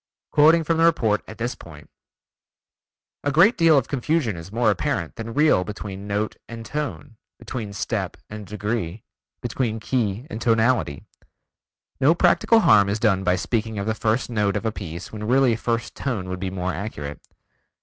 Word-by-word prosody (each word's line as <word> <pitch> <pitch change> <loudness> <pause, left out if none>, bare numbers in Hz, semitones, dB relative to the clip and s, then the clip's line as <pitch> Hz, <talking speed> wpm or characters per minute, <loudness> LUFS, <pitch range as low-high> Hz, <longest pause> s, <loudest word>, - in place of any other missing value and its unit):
Quoting 160 +3 +5
from 165 +1 0
the 165 - +3
report 115 -11 +3
at 110 - -10
this 120 +2 -2
point: 75 -10 -13 1.4
"A 145 - +1
great 175 - +5
deal 165 -3 +5
of 130 - +1
confusion 140 - 0
is 85 +3 -9
more 115 0 +2
apparent 100 - -2
than 115 0 -6
real 150 -11 +4
between 100 0 -7
note 105 +1 -2
and 115 -1 -8
tone, 145 -2 -5 0.2
between 110 -5 -6
step 100 - -3
and 105 -1 -8
degree, 105 -1 -3 0.4
between 120 -2 -2
key 110 0 -1
and 115 -8 -7
tonality. 115 - +1 1.0
No 145 +5 +4
practical 190 +6 +4
harm 100 - +5
is 100 - 0
done 105 -4 +2
by 90 -1 +2
speaking 110 +2 -2
of 100 - -2
the 110 - 0
first 110 +2 0
note 105 -3 0
of 105 - -5
a 110 - +1
piece 85 -5 -7
when 105 -1 -6
really 130 -1 +4
first 115 0 -2
tone 110 -9 -3
would 95 0 -4
be 95 0 -2
more 95 0 -3
accurate. 75 -6 -6
110 Hz, 170 wpm, -23 LUFS, 100-130 Hz, 1.4 s, Quoting